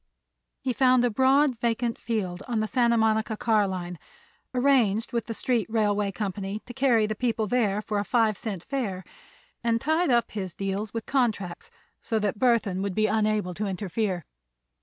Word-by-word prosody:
He 255 - -1
found 255 -1 +4
a 245 - +1
broad 265 +1 +3
vacant 235 0 -1
field 195 -6 -3
on 235 -3 -1
the 215 - +1
Santa 235 0 +2
Monica 220 0 +1
car 215 -3 +2
line; 180 -2 -5 0.5
arranged 245 -5 +2
with 235 - -1
the 230 - -4
street 240 -2 0
railway 210 -2 +1
company 195 +1 -4
to 245 - -9
carry 245 -4 +3
the 215 - -2
people 225 0 -1
there 210 -2 +1
for 210 -1 -1
a - - 0
five 225 -1 +2
cent 195 -4 -5
fare, 210 -10 -3 0.6
and 230 -1 +2
tied 315 +6 +1
up 240 -2 +2
his 190 -4 -5
deals 200 +2 -3
with 230 -1 -4
contracts 225 - -1 0.3
so 225 - -1
that 205 -1 -1
Burthon 225 -7 +2
would 195 -2 -2
be 215 - +2
unable 215 -3 +1
to 205 +4 -3
interfere. 190 -2 -2
220 Hz, 175 wpm, -26 LUFS, 200-240 Hz, 0.6 s, found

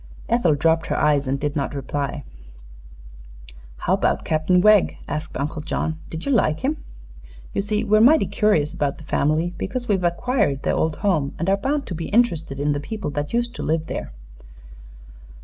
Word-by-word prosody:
Ethel 220 -10 +3
dropped 165 +2 +2
her - - -1
eyes 145 -2 +2
and 135 +1 -1
did 145 0 -2
not 145 0 -2
reply. 140 +1 -3 1.5
"How - - 0
about - - +1
Cap'n 155 +3 +2
Wegg?" 210 0 +4
asked 155 +1 -4
Uncle 150 +3 -3
John. 155 +1 -2
"Did 160 0 -6
you 280 - 0
like 160 - +2
him? 295 +4 0 0.8
You - - 0
see, 210 +2 -1
we're 215 0 +4
mighty 300 +7 +6
curious 205 -10 +1
about 145 -1 -1
the - - -12
family, 155 +3 0
because 245 +4 -3
we've 195 -4 +1
acquired 175 - 0
their - - +1
old 160 -1 0
home, 155 -8 +1
and 170 - -3
are - - +5
bound 275 +7 -1
to - - -5
be 165 0 -5
interested 170 - +1
in 145 +1 +1
the 145 - -1
people 210 +1 -5
that 145 0 -3
used 240 0 -1
to - - -4
live 160 +1 0
there." - - -5
160 Hz, 185 wpm, -22 LUFS, 145-215 Hz, 1.5 s, mighty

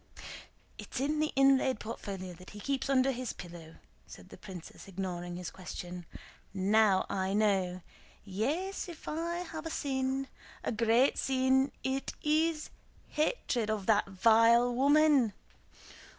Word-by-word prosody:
"It's - - -5
in 295 +3 0
the 310 0 +1
inlaid 270 -3 +4
portfolio 195 -4 -6
that 180 +2 -13
he 210 - -10
keeps 270 +4 -2
under 270 0 +4
his 255 -1 -4
pillow," 170 -2 -10 0.3
said - - -13
the - - -11
princess, 185 -2 -10
ignoring 175 -2 -4
his 180 0 -6
question. 180 -1 -8 0.5
"Now 200 0 +3
I 190 0 -1
know! 190 -4 +1 0.4
Yes; 295 - -2
if 335 - -11
I 340 +3 -2
have 315 0 -5
a - - -4
sin, 265 -2 -1 0.4
a - - -1
great 230 +3 +3
sin, 265 +1 +2
it 265 +1 -2
is 310 +1 +1 0.4
hatred 300 - 0
of 215 -3 -1
that 210 -1 +3
vile 230 +5 +5
woman!" 280 -3 +4
235 Hz, 135 wpm, -31 LUFS, 190-275 Hz, 0.5 s, vile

